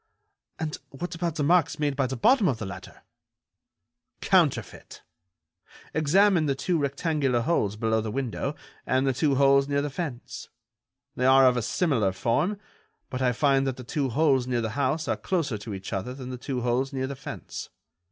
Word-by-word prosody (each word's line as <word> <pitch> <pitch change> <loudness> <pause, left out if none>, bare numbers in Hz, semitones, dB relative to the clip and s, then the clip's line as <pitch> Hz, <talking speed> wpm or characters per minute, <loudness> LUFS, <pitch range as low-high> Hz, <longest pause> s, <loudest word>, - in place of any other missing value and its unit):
"And 160 -1 -4
what 175 +7 -6
about 170 -2 -2
the 150 - -1
marks 165 +1 +3
made 145 -2 0
by 135 -1 +1
the 130 0 -4
bottom 230 - +4
of 130 - +1
the 110 - -5
ladder?" 95 - -10 1.2
"Counterfeit! - - 0 0.9
Examine 170 +2 +3
the 135 - +1
two 165 +5 0
rectangular 140 -3 0
holes 110 -7 0
below 110 0 0
the 110 - -4
window, 135 +4 -3 0.3
and 130 +1 +2
the 135 - +2
two 140 +2 +1
holes 140 0 +4
near 140 0 0
the 145 - -3
fence. 140 -5 -6 0.7
They 125 - +1
are 135 0 +7
of 125 -1 +5
a 120 - 0
similar 115 - +1
form, 140 - 0 0.5
but 130 0 -3
I 125 -1 +3
find 135 +1 +2
that 130 -1 -2
the 130 - -8
two 135 +3 -2
holes 135 -1 +2
near 125 -2 0
the 110 -1 -2
house 140 +5 -1
are - - +1
closer 155 - -1
to 105 +2 -8
each 95 -1 -6
other 120 +7 -3
than 130 -1 -7
the 125 - -5
two 130 -1 -3
holes 125 +3 0
near 130 -1 -2
the 140 +1 -5
fence. - - -8
135 Hz, 185 wpm, -26 LUFS, 125-150 Hz, 1.2 s, are